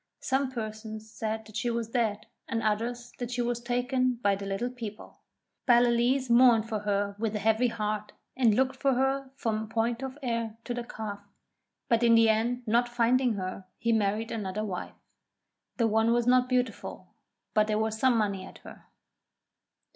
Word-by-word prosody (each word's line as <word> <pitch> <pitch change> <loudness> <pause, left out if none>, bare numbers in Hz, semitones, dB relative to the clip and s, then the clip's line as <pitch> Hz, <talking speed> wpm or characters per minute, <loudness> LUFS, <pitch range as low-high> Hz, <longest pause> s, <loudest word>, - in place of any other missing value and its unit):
Some 265 0 0
persons 220 -2 -6
said 220 0 -3
that 215 -1 -14
she 240 - 0
was 230 -1 -2
dead 220 -4 0 0.2
and 225 -1 -2
others 235 +3 -1
that 245 -1 -3
she 245 -1 -1
was 240 0 -1
taken 250 +1 0
by 200 -1 +3
the 200 0 -6
Little 200 +6 -2
People. 225 -4 -8 0.5
Ballaleece 245 +2 +4
mourned 235 -2 +5
for 220 -2 -2
her 200 -1 -1
with 220 -1 -1
a - - +1
heavy 220 +3 +2
heart 215 -2 -3 0.2
and 235 -5 +4
looked 265 +2 +2
for 275 0 +2
her 270 +1 0
from 220 -4 -2
Point 230 +2 0
of 265 +1 -5
Ayr 230 -3 -2
to 245 - -3
the 240 0 -3
Calf; 215 -3 -6 0.7
but 230 -1 +3
in 235 -1 +6
the 225 -1 +6
end, 235 +3 +1
not 240 +2 +2
finding 240 0 +2
her, 185 0 -5
he 230 0 +1
married 215 +1 0
another 210 -1 -3
wife. 185 -4 -5 0.8
This 230 - +3
one 220 +1 +3
was 240 -1 +2
not 250 0 +4
beautiful, 250 0 -2 0.4
but 215 0 +3
there 215 -1 +1
was 220 0 -1
some 255 -1 +4
money 200 -3 0
at - - -11
her. - - -12
230 Hz, 175 wpm, -28 LUFS, 215-245 Hz, 0.8 s, in